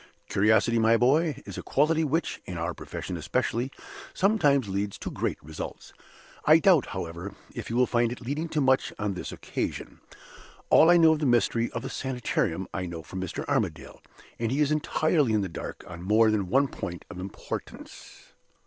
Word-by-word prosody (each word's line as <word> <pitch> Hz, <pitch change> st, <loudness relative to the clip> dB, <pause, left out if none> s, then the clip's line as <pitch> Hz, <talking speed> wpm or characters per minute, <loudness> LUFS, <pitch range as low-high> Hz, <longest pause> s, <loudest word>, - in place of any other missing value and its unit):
"Curiosity, 110 Hz, +3 st, +3 dB
my 115 Hz, 0 st, +4 dB
dear -, -, +5 dB
boy, 145 Hz, +6 st, +2 dB
is -, -, -7 dB
a -, -, -4 dB
quality 155 Hz, +3 st, +2 dB
which 160 Hz, +3 st, -1 dB
(in 90 Hz, -, -6 dB
our 85 Hz, +1 st, -2 dB
profession -, -, -6 dB
especially) 120 Hz, +4 st, -1 dB, 0.5 s
sometimes 150 Hz, -, +3 dB
leads 100 Hz, +1 st, -2 dB
to -, -, -6 dB
great -, -, -2 dB
results. 80 Hz, +1 st, -8 dB, 0.5 s
I 155 Hz, +1 st, +7 dB
doubt, 165 Hz, -4 st, +4 dB
however, 85 Hz, +4 st, -6 dB, 0.2 s
if -, -, -6 dB
you 115 Hz, -, -3 dB
will 125 Hz, +1 st, +4 dB
find 120 Hz, -1 st, +1 dB
it 120 Hz, -, -6 dB
leading 145 Hz, +7 st, -3 dB
to 155 Hz, -, 0 dB
much 130 Hz, -1 st, +2 dB
on 105 Hz, -2 st, -1 dB
this 90 Hz, -, -6 dB
occasion. -, -, -5 dB, 0.7 s
All 160 Hz, -, +7 dB
I 175 Hz, -, +7 dB
know 165 Hz, -2 st, +6 dB
of 155 Hz, -, -2 dB
the 150 Hz, -, +1 dB
mystery 120 Hz, -1 st, +2 dB
of -, -, -5 dB
the -, -, -4 dB
Sanitarium, 120 Hz, -8 st, -2 dB
I 90 Hz, -, -3 dB
know 85 Hz, -2 st, -7 dB
from 95 Hz, +3 st, -6 dB
Mr. 95 Hz, -, -5 dB
Armadale: -, -, -2 dB, 0.4 s
and 115 Hz, 0 st, -1 dB
he 135 Hz, -, 0 dB
is 150 Hz, -1 st, +2 dB
entirely 155 Hz, -3 st, +1 dB
in 105 Hz, -, +2 dB
the 95 Hz, -, -3 dB
dark 85 Hz, -, -7 dB
on 85 Hz, -1 st, -9 dB
more 110 Hz, +4 st, +4 dB
than 100 Hz, -3 st, 0 dB
one 135 Hz, +6 st, +3 dB
point 90 Hz, -8 st, -7 dB
of 90 Hz, -, -8 dB
importance. 95 Hz, +1 st, -8 dB
120 Hz, 190 wpm, -27 LUFS, 95-150 Hz, 0.7 s, I